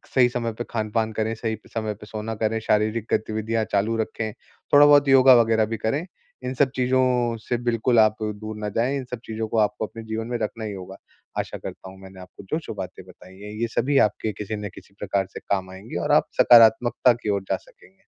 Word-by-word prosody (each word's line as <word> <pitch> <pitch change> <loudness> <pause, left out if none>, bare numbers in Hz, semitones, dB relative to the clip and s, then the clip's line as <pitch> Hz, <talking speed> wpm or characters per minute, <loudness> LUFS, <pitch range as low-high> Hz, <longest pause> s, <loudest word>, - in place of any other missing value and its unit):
सही 125 -2 +5
समय 120 -2 -2
पे 120 - -3
खान-पान 110 0 -1
करें, 110 +1 -1
सही 110 -1 -3 0.2
समय 110 -2 -2
पे 105 - -13
सोना 110 +1 -5
करें, 110 +1 -1
शारीरिक 110 +1 +1
गतिविधियाँ 110 +1 -1
चालू 105 +3 +1
रखें, 110 0 -3 0.4
थोड़ा-बहुत 145 0 +7
योगा 130 -1 +8
वग़ैरह 110 -1 +2
भी - - -2
करें। 135 - -1 0.4
इन 125 - -3
सब 135 +1 +3
चीज़ों 125 -2 +1
से 120 - 0
बिल्कुल 120 0 +2
आप 110 0 +5
दूर 105 0 -5
ना 105 -1 -3
जाएँ, 130 +5 +1
इन 135 - -4
सब 125 - -4
चीज़ों 110 0 -4
को 115 - -2
आपको 105 +1 +1
अपने 115 - -10
जीवन 110 0 -4
में 120 0 -2
रखना 110 +1 -4
ही 105 - -4
होगा। 95 0 -9 0.4
आशा - - -4
करता 95 - -9
हूँ, 95 0 -14
मैंने 95 -1 -12
आपको 90 +2 -13
जो-जो 155 -6 -3
बातें 95 -2 -7
बताई 95 0 -16
हैं, 105 +1 -8
ये 115 - +1
सभी 140 +1 +2
आपके 110 +1 -4
किसी 110 +2 -4
न 105 -1 -5
किसी 100 - -15
प्रकार 100 -1 -1
से - - -6
काम 95 -2 -2
आएँगी 95 0 -7
और - - 0
आप - - +4
सकारात्मकता 120 +1 +6
की 105 - -2
ओर 100 -1 +1
जा 95 - +2
सकेंगे। 95 +2 -22
110 Hz, 215 wpm, -24 LUFS, 105-120 Hz, 0.4 s, योगा